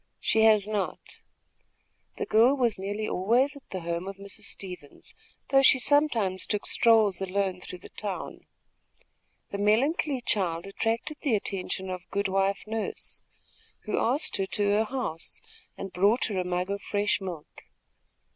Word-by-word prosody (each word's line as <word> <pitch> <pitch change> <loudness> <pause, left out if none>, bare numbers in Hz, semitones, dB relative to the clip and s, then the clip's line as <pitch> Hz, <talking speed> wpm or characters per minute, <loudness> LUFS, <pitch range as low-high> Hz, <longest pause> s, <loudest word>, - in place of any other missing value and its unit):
"She 220 - +2
has 215 -2 +5
not." 210 -3 -3 1.0
The - - -2
girl 235 +5 +5
was 235 -6 +1
nearly 205 +3 -3
always 240 +10 +2
at 280 - -15
the 185 - -5
home 170 +2 -3
of 195 - -5
Mrs. 200 +2 -9
Stevens, 180 -7 -7 0.4
though 270 0 +5
she 260 - +7
sometimes 250 -9 +2
took 210 -1 -1
strolls 220 -5 +4
alone 190 -1 -1
through 180 - -7
the - - -13
town. 205 -3 -6 1.0
The 200 - -4
melancholy 260 +6 +2
child 175 -7 0
attracted 225 +8 -2
the 260 -7 +2
attention 190 -1 -3
of 180 -1 -7
Good 200 0 -1
wife 195 0 +1
Nurse, 220 0 -4 0.6
who 215 - -1
asked 280 +7 +1
her 195 - -1
to 205 - -1
her 215 +2 +3
house 215 -10 -4 0.4
and 195 -1 -6
brought 200 +7 +3
her 195 -3 -1
a - - 0
mug 180 +1 -2
of 200 0 -3
fresh 205 0 0
milk. 175 -5 -8
200 Hz, 155 wpm, -28 LUFS, 190-225 Hz, 1.0 s, she